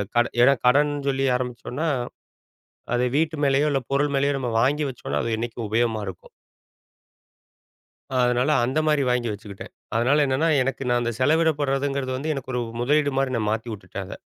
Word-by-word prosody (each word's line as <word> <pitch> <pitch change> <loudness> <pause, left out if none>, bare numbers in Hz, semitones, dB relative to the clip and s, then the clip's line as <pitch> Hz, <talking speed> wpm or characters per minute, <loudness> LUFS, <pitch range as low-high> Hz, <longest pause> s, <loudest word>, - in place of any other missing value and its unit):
கடன் 120 0 +2
ஏன்னா 135 +3 +7
கடன் 145 +4 +4 0.2
சொல்லி 135 0 0
ஆரம்பிச்சோம்னா, 125 +4 -3 1.1
அதை 125 +1 +2
வீட்டு 160 0 +1
மேலயோ, 140 +2 +3
இல்ல 135 - 0
பொருள் 140 +1 +1
மேலயோ 140 +1 +2
நம்ம 125 - -2
வாங்கி 145 +5 +2
வச்சோம்னா, 125 - -4
அது 115 -1 -1
என்னைக்கும் 115 -1 -4
உபயோகமா 115 0 +1
இருக்கும். 95 -2 -9 1.9
அதுனால 125 +3 +2
அந்த 130 +5 -1
மாதிரி 150 -2 +3
வாங்கி 125 -1 0
வச்சுக்கிட்டேன். 105 -1 -9 0.2
அதுனால 135 +6 +3
என்னன்னா, 135 +5 +1
எனக்கு 135 +1 -3
நான் 120 0 +2
அந்த 120 0 -1
செலவிடப்படுறதுங்கிறது 140 -3 +1
வந்து 155 +4 -2
எனக்கு 130 -1 -6
ஒரு 125 - 0 0.2
முதலீடு 145 +2 +2
மாதிரி 135 -1 0
நான் 110 -2 -1
மாத்திவுட்டுட்டேன், 105 -4 -5
அத. - - -8
130 Hz, 155 wpm, -24 LUFS, 120-145 Hz, 1.9 s, ஏன்னா